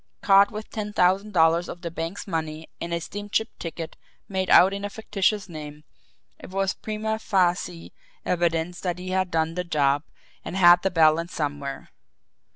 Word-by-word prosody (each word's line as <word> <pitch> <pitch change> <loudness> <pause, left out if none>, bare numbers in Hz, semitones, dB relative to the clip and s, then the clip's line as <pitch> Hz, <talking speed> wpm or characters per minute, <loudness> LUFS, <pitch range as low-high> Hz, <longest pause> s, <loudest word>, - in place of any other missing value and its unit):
Caught 200 0 +6
with 215 0 -7
ten 210 -1 -4
thousand 195 +3 +2
dollars 170 -1 +3
of 175 - -8
the 170 - -4
bank's 165 +5 -5
money 160 -3 -4
and 170 - -4
a 170 - 0
steamship 205 +5 -3
ticket 165 -1 -6 0.3
made 190 -1 -2
out 190 +2 +7
in 200 0 -5
a 205 - -2
fictitious 210 -1 -1
name, 150 -3 -9 0.6
it - - -11
was 195 0 0
prima 220 0 -3
facie 180 -4 0 0.3
evidence 170 0 0
that 180 -2 -2
he 180 +1 -7
had 185 -1 0
done 160 -1 0
the 180 +1 -2
job 145 -4 +1 0.4
and 190 - -5
had 175 -1 +7
the 195 - +1
balance 165 0 +3
somewhere. 145 -3 -4
180 Hz, 165 wpm, -25 LUFS, 165-195 Hz, 0.6 s, out